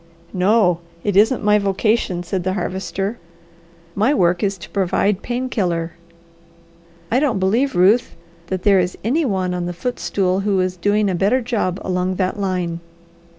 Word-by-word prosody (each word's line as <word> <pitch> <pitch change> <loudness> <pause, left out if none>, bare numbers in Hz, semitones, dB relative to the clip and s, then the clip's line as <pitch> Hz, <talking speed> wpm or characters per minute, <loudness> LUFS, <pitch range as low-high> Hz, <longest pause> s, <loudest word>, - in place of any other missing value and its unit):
"No! 185 -2 +3 0.2
It 205 -2 -1
isn't 220 +5 +4
my 210 0 +4
vocation," 200 -2 0
said 180 +1 -3
the 185 +1 -1
Harvester. 195 +3 -3 0.7
"My 220 +10 +2
work 175 -2 +2
is 200 -1 0
to 170 - -11
provide 195 +1 +1
pain 245 +1 -3
killer. 175 -8 -1 1.2
I 245 - +3
don't 275 -7 +1
believe, 215 +7 +1
Ruth, 205 +8 +3 0.3
that 185 -1 -3
there 200 -2 +5
is 180 0 -1
any 290 +9 +1
one 190 -5 -1
on 175 -1 -3
the 175 - -4
footstool 185 -2 -1
who 195 -1 0
is 185 0 0
doing 205 +3 +1
a 190 - 0
better 200 +8 +2
job 225 -7 -2
along 185 0 -1
that 185 +2 -1
line. 180 -4 -2
195 Hz, 160 wpm, -20 LUFS, 180-215 Hz, 1.2 s, there